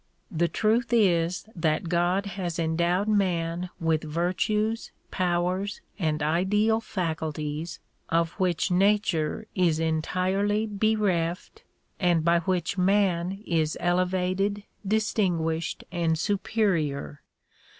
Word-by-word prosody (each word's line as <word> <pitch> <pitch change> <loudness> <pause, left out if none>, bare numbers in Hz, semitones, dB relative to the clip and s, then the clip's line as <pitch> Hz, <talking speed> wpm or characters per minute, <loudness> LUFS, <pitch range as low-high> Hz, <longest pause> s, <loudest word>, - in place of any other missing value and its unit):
The 170 -1 +1
truth 225 +6 +1
is 180 -6 +2
that 160 0 0
God 175 +3 +1
has 185 -4 -4
endowed 170 +4 +1
man 180 -4 0
with 160 -1 +1
virtues, 185 +8 -1 0.2
powers 180 +2 0 0.2
and 155 -4 0
ideal 205 +8 +2
faculties 160 -4 -3 0.3
of 165 0 +1
which 180 -2 +1
nature 195 -3 +1
is 170 -5 +2
entirely 185 +6 0
bereft 205 - 0 0.4
and 175 -4 +2
by 170 0 +4
which 180 +1 -1
man 190 0 +1
is 160 -2 0
elevated, 185 +3 0 0.2
distinguished 180 -6 0
and 165 -2 +1
superior. 170 -7 -1
180 Hz, 100 wpm, -26 LUFS, 165-200 Hz, 0.4 s, by